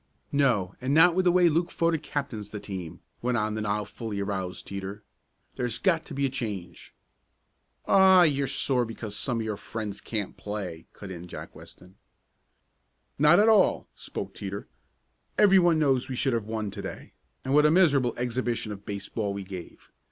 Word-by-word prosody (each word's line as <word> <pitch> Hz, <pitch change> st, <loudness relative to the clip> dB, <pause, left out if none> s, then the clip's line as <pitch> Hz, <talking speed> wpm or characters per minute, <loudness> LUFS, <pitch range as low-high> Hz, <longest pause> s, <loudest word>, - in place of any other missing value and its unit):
"No, 120 Hz, -10 st, +2 dB
and 135 Hz, +3 st, 0 dB
not 170 Hz, +2 st, +7 dB
with 185 Hz, +1 st, +1 dB
the 175 Hz, -, +6 dB
way 180 Hz, 0 st, +5 dB
Luke 170 Hz, +2 st, +1 dB
Fodick 165 Hz, -2 st, 0 dB
captains 120 Hz, -9 st, -4 dB
the 105 Hz, -, -6 dB
team," 90 Hz, -5 st, -7 dB, 0.2 s
went 125 Hz, 0 st, 0 dB
on 110 Hz, -1 st, 0 dB
the 110 Hz, -, -3 dB
now 105 Hz, 0 st, -1 dB
fully 105 Hz, 0 st, -6 dB
aroused 95 Hz, -2 st, -3 dB
Teeter. 100 Hz, +1 st, -6 dB, 0.5 s
"There's 120 Hz, -2 st, -1 dB
got 170 Hz, -1 st, +1 dB
to 150 Hz, -, -8 dB
be 140 Hz, 0 st, +1 dB
a -, -, +1 dB
change." 105 Hz, -9 st, -6 dB, 0.9 s
"Aw, 190 Hz, -2 st, +7 dB
you're 140 Hz, -4 st, +2 dB
sore 125 Hz, -2 st, +1 dB
because 110 Hz, -2 st, -6 dB
some 120 Hz, +2 st, -1 dB
of -, -, -3 dB
your 105 Hz, -2 st, -3 dB
friends 105 Hz, -2 st, -6 dB
can't 105 Hz, -4 st, -4 dB
play!" 100 Hz, -6 st, -6 dB
cut 100 Hz, -2 st, -9 dB
in 90 Hz, -1 st, -8 dB
Jake -, -, -9 dB
Weston. 90 Hz, +1 st, -15 dB, 1.2 s
"Not 150 Hz, +5 st, +6 dB
at 215 Hz, -, +5 dB
all," 215 Hz, -3 st, +4 dB
spoke -, -, -6 dB
Teeter. -, -, -6 dB, 0.7 s
"Everyone 185 Hz, -5 st, +5 dB
knows 135 Hz, -4 st, +2 dB
we 130 Hz, -, -3 dB
should 130 Hz, +1 st, +1 dB
have 115 Hz, -3 st, -1 dB
won 110 Hz, -2 st, -3 dB
to 100 Hz, 0 st, -7 dB
day, -, -, -8 dB, 0.3 s
and 130 Hz, -, 0 dB
what 150 Hz, +1 st, +6 dB
a -, -, +4 dB
miserable 145 Hz, -8 st, +3 dB
exhibition 120 Hz, -2 st, -2 dB
of 100 Hz, -1 st, -9 dB
baseball 100 Hz, 0 st, -3 dB
we 100 Hz, -, -4 dB
gave! 95 Hz, -2 st, -10 dB
115 Hz, 180 wpm, -27 LUFS, 100-150 Hz, 1.2 s, not